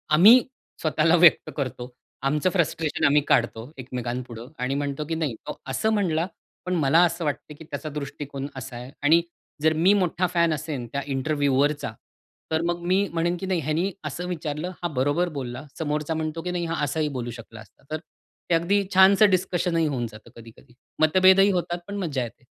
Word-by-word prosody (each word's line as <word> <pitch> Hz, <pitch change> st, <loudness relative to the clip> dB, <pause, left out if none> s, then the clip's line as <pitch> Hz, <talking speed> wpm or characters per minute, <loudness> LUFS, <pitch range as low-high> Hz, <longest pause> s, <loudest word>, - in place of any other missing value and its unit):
आम्ही 215 Hz, +10 st, +9 dB, 0.4 s
स्वतःला 160 Hz, +1 st, +3 dB
व्यक्त 170 Hz, -1 st, +5 dB
करतो. 125 Hz, -3 st, -4 dB, 0.3 s
आमचं 150 Hz, +6 st, +1 dB
फ्रस्ट्रेशन 165 Hz, -3 st, 0 dB
आम्ही 145 Hz, +1 st, +5 dB
काढतो 120 Hz, 0 st, +1 dB
एकमेकांपुढं 125 Hz, -2 st, -5 dB
आणि 130 Hz, +2 st, -1 dB
म्हणतो 145 Hz, +1 st, -2 dB
की 165 Hz, -, 0 dB
नाही 155 Hz, -7 st, -2 dB
तो -, -, -6 dB
असं 135 Hz, +11 st, 0 dB
म्हणला, 170 Hz, -6 st, +1 dB, 0.4 s
पण 180 Hz, 0 st, -1 dB
मला 155 Hz, 0 st, +4 dB
असं 170 Hz, -1 st, -2 dB
वाटतं 150 Hz, +1 st, -3 dB
की -, -, -9 dB
त्याचा 155 Hz, 0 st, -6 dB
दृष्टिकोन 140 Hz, -1 st, -6 dB
असा 130 Hz, -1 st, -7 dB
आहे. 125 Hz, +2 st, -9 dB
आणि 160 Hz, +3 st, +5 dB, 0.4 s
जर 160 Hz, 0 st, +4 dB
मी 175 Hz, +6 st, +4 dB
मोठा 185 Hz, -2 st, +1 dB
फॅन 170 Hz, -2 st, +2 dB
असेन 150 Hz, -5 st, -4 dB
त्या 140 Hz, -, -2 dB
इंटरव्युवरचा, 145 Hz, -1 st, 0 dB, 0.6 s
तर 160 Hz, 0 st, +1 dB
मग 175 Hz, 0 st, -1 dB
मी 190 Hz, +3 st, +2 dB
म्हणेन 170 Hz, +1 st, 0 dB
की 190 Hz, -, -4 dB
नाही 185 Hz, -2 st, 0 dB
ह्यानी 160 Hz, +6 st, 0 dB
असं 170 Hz, +5 st, -4 dB
विचारलं, 160 Hz, 0 st, -4 dB
हा 175 Hz, -, +2 dB
बरोबर 145 Hz, +7 st, +1 dB
बोलला, 125 Hz, +2 st, -6 dB
समोरचा 150 Hz, 0 st, -1 dB
म्हणतो 160 Hz, +1 st, -3 dB
की 180 Hz, -, -3 dB
नाही, 175 Hz, -1 st, -2 dB
हा 165 Hz, -2 st, -2 dB
असाही 150 Hz, +2 st, 0 dB
बोलू 120 Hz, -1 st, -4 dB
शकला 115 Hz, -1 st, -11 dB
असता. 110 Hz, -, -19 dB
तर 155 Hz, -, -1 dB, 0.5 s
ते 170 Hz, -, +4 dB
अगदी 195 Hz, +5 st, +2 dB
छानसं 195 Hz, +2 st, +7 dB
डिस्कशनही 180 Hz, -3 st, +1 dB
होऊन 125 Hz, -5 st, -2 dB
जातं 110 Hz, +1 st, -14 dB
कधी-कधी, 115 Hz, +1 st, -15 dB, 0.3 s
मतभेदही 185 Hz, +5 st, +6 dB
होतात 175 Hz, -1 st, -2 dB
पण 200 Hz, -, -5 dB
मज्जा 150 Hz, -10 st, -2 dB
येते. 120 Hz, +3 st, -10 dB
155 Hz, 180 wpm, -25 LUFS, 135-175 Hz, 0.6 s, आम्ही